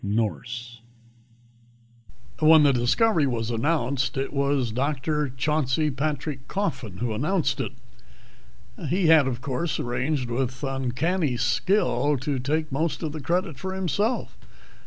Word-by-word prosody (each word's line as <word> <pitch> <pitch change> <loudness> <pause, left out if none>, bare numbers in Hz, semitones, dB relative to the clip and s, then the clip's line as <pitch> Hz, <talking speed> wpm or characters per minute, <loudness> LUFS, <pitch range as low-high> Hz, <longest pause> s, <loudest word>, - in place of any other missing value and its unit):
Nourse 115 +3 -2 1.6
When 155 0 +7
the 140 -2 +5
discovery 145 - +3
was 115 -2 -2
announced, 135 +1 0
it 135 - -2
was 140 -4 +1
Dr. 145 +3 -1
Chauncey 150 +2 0
Patrick 140 -1 -3
Coffin 130 - -3
who 120 0 -2
announced 145 - 0
it. 115 - -4 1.2
He 180 +2 +1
had, 155 -4 +6
of 125 -2 -3
course, 140 +5 -2
arranged 125 +2 -1
with 125 +1 -2
uncanny 135 +3 0
skill 150 - +1
to 135 +1 -2
take 150 +4 -1
most 155 +5 -1
of 155 - -2
the 155 0 -6
credit 165 -1 -1
for 190 0 -4
himself. 200 - -1
140 Hz, 125 wpm, -25 LUFS, 125-155 Hz, 1.6 s, When